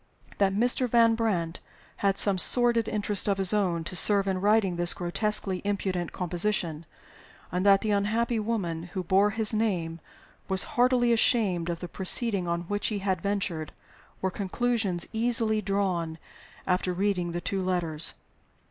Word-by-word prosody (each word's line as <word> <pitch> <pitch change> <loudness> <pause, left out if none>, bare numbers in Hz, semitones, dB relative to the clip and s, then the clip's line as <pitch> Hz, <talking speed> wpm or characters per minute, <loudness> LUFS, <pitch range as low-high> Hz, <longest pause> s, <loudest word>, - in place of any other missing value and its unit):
That 195 -1 +1
Mr. 245 +3 +1
Van 230 -1 +4
Brandt 190 -8 -2 0.4
had 195 -1 0
some 195 -2 +4
sordid 235 +1 +5
interest 210 -1 +2
of 200 -1 +1
his 195 0 0
own 180 -5 0
to 175 - -5
serve 200 +1 +5
in 190 -1 -2
writing 205 -3 +2
this 175 0 +4
grotesquely 190 +1 0
impudent 190 -4 -3
composition, 175 -3 -3 0.6
and 180 +2 -2
that 195 -1 +5
the 215 - -2
unhappy 220 +3 0
woman 180 -7 -4
who 185 - -2
bore 195 +4 +2
his 220 +1 +1
name 180 -7 -2 0.5
was 190 -1 +2
heartily 245 -1 +2
ashamed 205 -8 +1
of 170 -1 -4
the 175 - -5
proceeding 195 +1 0
on 170 0 -2
which 205 +4 -3
he 215 - -2
had 190 -3 -2
ventured, 190 -6 -3 0.5
were 190 - 0
conclusions 200 -2 -2
easily 225 -1 +1
drawn 185 -5 -2 0.5
after 180 0 -1
reading 180 -2 -1
the 175 - -4
two 195 +2 -3
letters. 170 -4 -2
195 Hz, 155 wpm, -26 LUFS, 175-215 Hz, 0.6 s, sordid